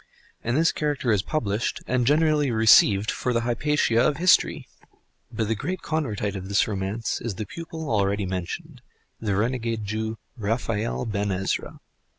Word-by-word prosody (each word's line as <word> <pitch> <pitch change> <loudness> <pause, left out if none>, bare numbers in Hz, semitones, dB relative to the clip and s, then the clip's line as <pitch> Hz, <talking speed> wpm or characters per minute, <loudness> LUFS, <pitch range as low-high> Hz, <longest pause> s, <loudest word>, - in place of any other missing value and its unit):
And 120 +3 0
this 165 +1 +4
character 145 -5 -1
is 105 -3 +3
published 110 -4 -2
and 125 -2 0
generally 150 -1 +3
received 110 -2 +5
for 125 - -2
the 115 - +1
Hypatia 120 0 +1
of 140 +3 +2
history! 180 +3 +3 0.6
But 110 - -2
the 110 - +1
great 175 - -4
Convertite 110 -10 -2
of 95 0 -6
this 100 - +3
romance 105 +2 -3
is 115 -4 -3
the 105 - -4
pupil 160 - -7
already 100 -3 +1
mentioned, 105 - -5 0.4
the 105 -4 -1
renegade 115 0 -1
Jew, 110 +2 -3 0.2
Raphael 115 +1 -1
Ben 105 -2 -1
Ezra. 95 0 -3
115 Hz, 155 wpm, -25 LUFS, 105-140 Hz, 0.6 s, received